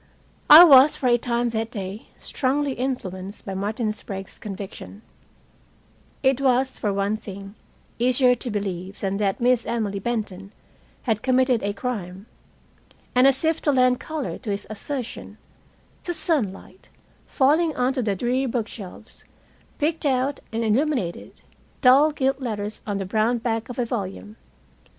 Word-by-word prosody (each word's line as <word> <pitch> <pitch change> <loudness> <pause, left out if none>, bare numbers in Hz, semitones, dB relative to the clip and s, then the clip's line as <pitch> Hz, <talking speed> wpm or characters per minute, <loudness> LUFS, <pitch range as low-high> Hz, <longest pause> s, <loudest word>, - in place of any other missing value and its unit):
I 310 +3 +12
was, 280 -3 +8
for - - -5
a 240 - +5
time 240 0 0
that 225 0 -2
day, 200 -2 -7
strongly 280 +2 -1
influenced 205 -7 -4
by 195 - -4
Martin 215 +3 -2
Sprague's 195 -2 -7
conviction. 200 +1 -8 1.2
It 265 0 +2
was, 260 0 +1
for 205 - 0
one 200 +2 0
thing, 195 -1 -9 0.5
easier 250 +1 +4
to 245 - -4
believe 195 -3 -4
than 195 0 -1
that 200 +1 0 0.3
Emily 210 -4 -2
Benton 200 -3 -4 0.5
had 220 -4 0
committed 255 -2 +2
a 200 0 -2
crime. 200 -4 -5 0.9
And, 250 +2 +5
as 275 +2 +2
if 320 0 +1
to 295 - +2
lend 255 -2 +3
color 310 -3 -5
to 240 - -7
his 200 0 -3
assertion, 245 +3 -6 0.7
the 350 - -3
sunlight, 195 - -3 0.4
falling 310 +4 +2
onto 255 +1 0
the 210 -4 0
dreary 250 +6 0
bookshelves, 225 -3 -6 0.5
picked 310 +1 0
out 265 +1 0
and 225 +1 -2
illuminated 230 - -1 0.4
dull 270 +4 +6
gilt 270 -2 0
letters 215 -4 -4
on 205 -1 -1
the 195 - -3
brown 220 +5 +1
back 225 0 -2
of 245 - -7
a 245 - 0
volume. 210 -1 -5
235 Hz, 140 wpm, -23 LUFS, 200-260 Hz, 1.2 s, I